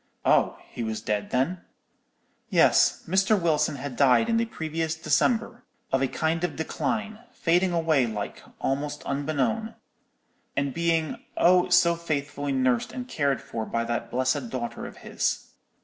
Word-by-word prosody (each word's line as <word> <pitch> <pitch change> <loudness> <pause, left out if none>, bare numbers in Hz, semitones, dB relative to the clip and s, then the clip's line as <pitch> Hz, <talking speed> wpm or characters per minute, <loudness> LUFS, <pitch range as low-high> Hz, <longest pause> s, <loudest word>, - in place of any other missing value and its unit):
"'Oh, - - +3
he - - -7
was 110 -1 -3
dead, 105 -1 -2
then?' 165 +9 0 0.9
"'Yes, - - +4
Mr. 190 +4 +3
Wilson 160 -4 +1
had 140 -1 -6
died 140 - +4
in 230 - +3
the 230 - +2
previous 160 -4 -3
December, 225 - +1 0.3
of 135 - +2
a 135 - +2
kind 160 +4 -1
of 175 -4 -1
decline, 215 +6 -2
fading 175 +2 +2
away 160 -7 +2
like, 105 -2 -5 0.2
almost 140 +2 -2
unbeknown; 150 - -1 0.8
and 140 -1 0
being, 165 -1 0
oh, 180 +1 +5
so 175 -1 +5
faithfully 145 -3 -3
nursed 130 -3 +1
and 250 -1 -6
cared 140 - 0
for 115 - -4
by 115 +1 -2
that 120 0 -3
blessed 130 0 0
daughter 120 -2 -4
of - - -12
his. - - -2
155 Hz, 150 wpm, -26 LUFS, 130-175 Hz, 0.9 s, oh